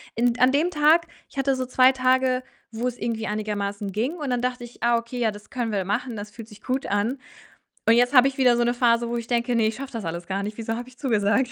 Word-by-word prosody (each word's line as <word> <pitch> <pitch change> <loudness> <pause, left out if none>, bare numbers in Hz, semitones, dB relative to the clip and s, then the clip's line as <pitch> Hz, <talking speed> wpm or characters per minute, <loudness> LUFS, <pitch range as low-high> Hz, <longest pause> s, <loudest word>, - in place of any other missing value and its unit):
In 240 +1 +2
d 245 - -11
an 255 +1 +6
dem 325 +5 +2
Tag 315 +2 +4 0.2
ich - - -18
hatte 270 0 +1
so 260 0 -2
2 255 0 +5
Tage, 255 0 +2 0.3
wo's 240 +2 -2
irgendwie 225 -1 -3
einigermaßen 205 -1 -3
ging 240 - -1
und 290 -4 -4
dann 245 - 0
dachte 250 0 -2
ich: 240 0 -12
„Ah, 235 0 +4
okay, 235 +2 -5
ja, 230 -2 +2
das 205 0 -13
können 240 -3 -2
wir 195 -3 -1
machen, 230 +4 -2
das 210 0 -7
fühlt 225 0 -10
sich 210 -2 -15
gut 260 +1 -2
an.“ 210 +7 -1 0.7
Und 225 - +7
jetzt 245 +3 +3
habe 255 0 +8
ich 270 - -8
wieder 250 -3 +5
so 240 - +2
'ne 240 +1 +1
Phase, 235 -1 +2
wo 240 - -2
ich 230 - -6
denke: 240 0 0
„Ne, 225 - +3
ich 220 - -4
schaffe 275 0 -7
das 225 -5 -5
alles 170 +1 -5
gar 195 +1 -2
nicht. 210 +1 -5
Wieso 225 0 -3
habe 245 +1 -7
ich 255 0 -18
zugesagt?“ 240 0 +1
240 Hz, 270 wpm, -24 LUFS, 220-255 Hz, 0.7 s, habe